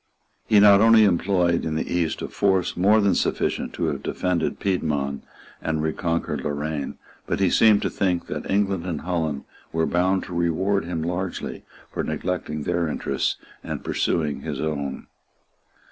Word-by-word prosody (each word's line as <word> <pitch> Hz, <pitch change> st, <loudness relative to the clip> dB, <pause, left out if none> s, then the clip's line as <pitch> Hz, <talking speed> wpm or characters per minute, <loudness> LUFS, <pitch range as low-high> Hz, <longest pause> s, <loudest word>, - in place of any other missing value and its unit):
He 105 Hz, -2 st, +6 dB
not 100 Hz, -1 st, +7 dB
only 115 Hz, 0 st, +7 dB
employed 90 Hz, -2 st, +2 dB
in 80 Hz, -, -2 dB
the 80 Hz, -, -2 dB
East 85 Hz, -2 st, -1 dB
a -, -, -2 dB
force 95 Hz, -3 st, +1 dB
more 105 Hz, +4 st, +4 dB
than 100 Hz, -2 st, +3 dB
sufficient -, -, -1 dB
to -, -, -4 dB
have -, -, -4 dB
defended 90 Hz, -3 st, -1 dB
Piedmont 75 Hz, -7 st, -1 dB, 0.4 s
and 80 Hz, -1 st, -1 dB
reconquered 80 Hz, -3 st, -1 dB
Loraine; 75 Hz, 0 st, -3 dB, 0.3 s
but -, -, -1 dB
he 95 Hz, -3 st, +3 dB
seemed 110 Hz, -2 st, +5 dB
to -, -, 0 dB
think 90 Hz, -3 st, 0 dB
that -, -, -5 dB
England 95 Hz, -3 st, +1 dB
and 80 Hz, -4 st, -3 dB
Holland 80 Hz, -5 st, -2 dB, 0.3 s
were 80 Hz, 0 st, +1 dB
bound 95 Hz, +3 st, +1 dB
to 90 Hz, -, -8 dB
reward 85 Hz, +3 st, +1 dB
him 85 Hz, -2 st, -3 dB
largely 90 Hz, +2 st, -4 dB, 0.3 s
for -, -, -2 dB
neglecting 80 Hz, -1 st, -3 dB
their 85 Hz, 0 st, 0 dB
interests 75 Hz, -, -1 dB, 0.3 s
and -, -, -5 dB
pursuing 75 Hz, -3 st, -1 dB
his -, -, -4 dB
own. 70 Hz, -3 st, -3 dB
85 Hz, 160 wpm, -24 LUFS, 80-95 Hz, 0.4 s, not